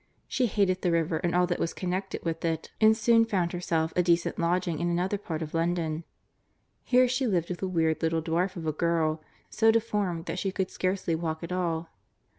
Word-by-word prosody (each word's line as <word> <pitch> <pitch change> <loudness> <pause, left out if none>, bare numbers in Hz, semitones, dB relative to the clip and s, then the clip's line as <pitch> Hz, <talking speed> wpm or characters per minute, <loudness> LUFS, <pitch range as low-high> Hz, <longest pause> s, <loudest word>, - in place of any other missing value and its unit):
She 255 -2 +1
hated 190 -3 +1
the 180 - +1
river 165 0 +1
and 175 +2 -1
all 180 0 +4
that 175 -1 -2
was 165 - -2
connected 185 +1 -3
with 165 -1 -2
it, 165 -1 -2
and 220 0 +6
soon 230 0 +5
found 185 -6 0
herself 165 -2 -1
a 180 - +4
decent 170 -1 +1
lodging 170 -1 0
in 175 0 0
another 180 +4 0
part 165 -5 -4
of 155 - -8
London. 165 -1 -1 0.8
Here 255 0 +4
she 255 +1 0
lived 175 -6 0
with 180 - -5
a 190 - -1
weird 160 -3 +1
little 160 0 0
dwarf 170 +4 0
of 170 -3 -6
a 155 - +1
girl, 160 -1 0 0.3
so 225 -1 +3
deformed 210 -7 0
that 170 +2 -3
she 195 - -1
could 190 -1 -2
scarcely 185 -2 -1
walk 160 0 -3
at 170 - -6
all. 170 -2 -1
175 Hz, 210 wpm, -28 LUFS, 165-190 Hz, 0.8 s, and